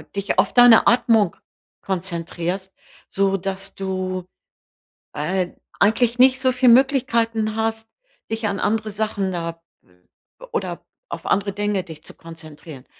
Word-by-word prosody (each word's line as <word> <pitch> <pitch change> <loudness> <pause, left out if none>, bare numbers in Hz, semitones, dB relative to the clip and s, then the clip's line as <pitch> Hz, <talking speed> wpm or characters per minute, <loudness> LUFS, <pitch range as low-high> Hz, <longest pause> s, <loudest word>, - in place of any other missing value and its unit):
dich 200 0 -1
auf - - +2
deine 245 -2 +7
Atmung 225 -6 +3 0.5
konzentrierst, 180 0 -3 0.3
so 195 0 +1
dass 195 +1 -4
du, 185 -1 -3 0.9
äh, 180 +4 -1 0.3
eigentlich 230 +3 +2
nicht 260 0 +5
so 260 - +3
viel 250 0 +3
Möglichkeiten 230 -4 +2
hast, 225 0 -2 0.4
dich 225 -1 -1
an 200 - -2
andere 215 0 0
Sachen, 205 -2 -2
da 165 -1 -5 0.9
oder 460 - -4 0.2
auf - - -7
andere 200 0 0
Dinge 205 -2 -1
dich 160 -3 -12
zu - - -8
konzentrieren. 155 -4 -12
200 Hz, 125 wpm, -21 LUFS, 185-225 Hz, 0.9 s, deine